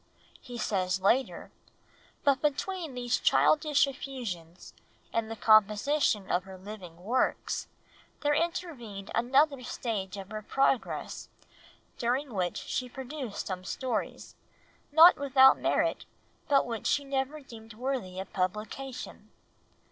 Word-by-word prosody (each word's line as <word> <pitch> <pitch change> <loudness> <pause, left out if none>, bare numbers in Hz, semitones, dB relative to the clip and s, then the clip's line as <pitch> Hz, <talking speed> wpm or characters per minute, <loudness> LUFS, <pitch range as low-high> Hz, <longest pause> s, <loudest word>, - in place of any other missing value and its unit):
He 245 -1 -9
says 190 -4 0
later, 230 +8 +1 0.7
"But 275 -2 +3
between 315 0 -2
these 245 0 0
childish 300 -2 +4
effusions 235 - -7 0.4
and 225 -1 -1
the 225 - -4
composition 215 +1 +3
of 180 0 +1
her 190 -1 -10
living 185 -3 -10
works, 245 +6 0 0.5
there 295 0 +2
intervened 300 - -3
another 275 +4 +3
stage 210 -5 -4
of 195 +1 -8
her 215 0 -4
progress, 270 +3 -1 0.7
during 250 +2 -1
which 180 -3 -1
she 250 -1 -3
produced 265 -3 -6
some 185 -1 -4
stories, 250 +8 -4 0.6
not 325 +4 +8
without 270 -1 +6
merit, - - 0 0.4
but 280 -2 +4
which 230 -3 -4
she 285 - +2
never 275 +2 -2
deemed 225 -5 -12
worthy 235 -7 -3
of 190 - -7
publication." 215 +8 -4
245 Hz, 120 wpm, -29 LUFS, 200-275 Hz, 0.7 s, not